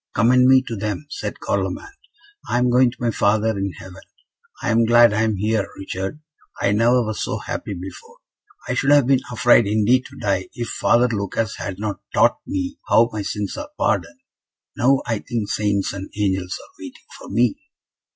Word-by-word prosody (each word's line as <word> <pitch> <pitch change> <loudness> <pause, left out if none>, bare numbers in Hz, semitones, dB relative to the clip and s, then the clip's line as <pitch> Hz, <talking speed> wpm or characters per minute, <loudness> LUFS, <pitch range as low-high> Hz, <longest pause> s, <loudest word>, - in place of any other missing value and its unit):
"Commend 125 +2 +4
me 130 0 +6
to 115 - -5
them," 105 +7 -4
said - - -5
Carloman. 400 - -3 0.6
"I - - +1
am 125 0 +2
going 125 0 +5
to 120 - -12
my 120 -1 0
Father 110 +1 +1
in 100 -1 -3
heaven. 90 +3 -12 0.6
I - - 0
am 115 +1 +3
glad 120 -1 +6
I 110 - +1
am 110 -1 +1
here, 105 +1 0
Richard; 95 +8 -5 0.4
I 100 - +1
never 120 +4 +3
was 110 0 -4
so - - -2
happy 100 - -5
before. 90 +1 -10 0.5
I - - -1
should 135 +2 0
have 145 -2 +6
been 135 0 +3
afraid 120 -2 +4
indeed 110 +5 +2
to - - -15
die, 95 -2 -1
if 120 -1 -4
Father 120 +1 +2
Lucas 110 0 -2
had 95 -2 -5
not 100 -3 -4
taught - - +4
me 285 0 -3
how 115 +1 +4
my 105 - -3
sins 100 0 -4
are 295 - -6
pardoned. 265 - -1 0.5
Now, 135 +2 +2
I 115 -3 -1
think 120 0 -3
the - - -2
Saints 100 -2 0
and 95 0 -7
Angels 95 -3 -1
are - - -16
waiting - - -11
for - - -11
me." 120 -1 +1
110 Hz, 190 wpm, -21 LUFS, 100-125 Hz, 0.6 s, me